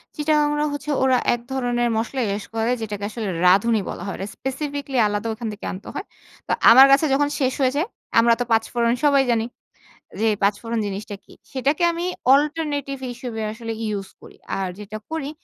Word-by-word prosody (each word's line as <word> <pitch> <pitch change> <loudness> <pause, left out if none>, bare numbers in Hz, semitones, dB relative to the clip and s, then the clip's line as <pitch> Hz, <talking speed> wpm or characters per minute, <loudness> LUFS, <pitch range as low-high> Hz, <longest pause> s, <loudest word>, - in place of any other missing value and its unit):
চিটাগাংড়া 300 -1 +1
হচ্ছে 290 +1 -6
ওরা 260 -1 +4 0.2
এক 240 - -3
ধরনের 245 -2 0
মসলা 245 +4 -2
ইউজ 205 - -5
করে 225 +2 +1
যেটাকে 205 -2 -5
আসলে 220 -1 -5 0.2
রাঁধুনি 205 +4 +4
বলা - - -6
হয়। 195 - -4
রে - - -2
স্পেসিফিকলি 280 0 -4
আলাদা 205 +2 -2
ওখান 225 +1 -6
থেকে 205 - -9
আনতে 190 - -9
হয়। 400 - -4 0.4
তো - - -2 0.2
আমার 260 +4 +10
কাছে 275 +3 +5
যখন 285 +1 +3
শেষ 260 -2 +1
হয়ে 260 -1 +3
যায়, 315 +8 0 0.3
আমরা 235 0 +5
তো - - +1
পাঁচফোড়ন 230 +1 +2
সবাই 280 -2 +5
জানি। 225 -1 +1 0.7
যে 225 - +3
পাঁচফোড়ন 210 +3 0
জিনিসটা 205 +1 -5
কি। - - -19 0.2
সেটাকে 275 +5 0
আমি 340 +1 -3 0.3
অল্টারনেটিভ 290 -2 0
হিসেবে 240 -2 -6
আসলে 225 0 -6
ইউজ 200 -2 -3
করি। - - -15 0.2
আর 190 -1 -1
যেটা 210 +1 -7
করি 315 -3 -3
240 Hz, 180 wpm, -22 LUFS, 220-285 Hz, 0.7 s, আমার